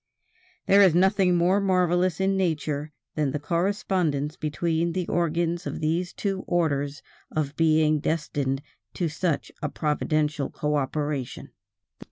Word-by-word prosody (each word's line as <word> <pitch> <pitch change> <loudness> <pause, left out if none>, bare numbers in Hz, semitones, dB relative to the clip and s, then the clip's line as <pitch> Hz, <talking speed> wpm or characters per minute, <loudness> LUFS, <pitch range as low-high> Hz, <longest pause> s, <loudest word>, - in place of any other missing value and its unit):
There 200 +1 +6
is 185 -5 +6
nothing 190 0 +4
more 180 +3 +3
marvelous 180 -2 +2
in 195 0 +2
nature 155 -5 -1 0.2
than 150 -2 0
the 145 - -2
correspondence 170 -3 0
between 165 +2 -1
the 180 -1 -2
organs 170 +1 0
of - - -4
these 170 +3 0
two 195 -2 -3
orders 145 -4 0 0.3
of 145 -2 -2
beings 155 -2 +3
destined 145 -4 -1 0.3
to 175 - 0
such 160 0 -2
a 150 - -1
providential 150 -1 0
cooperation. 145 -2 -2
160 Hz, 125 wpm, -26 LUFS, 150-180 Hz, 0.3 s, There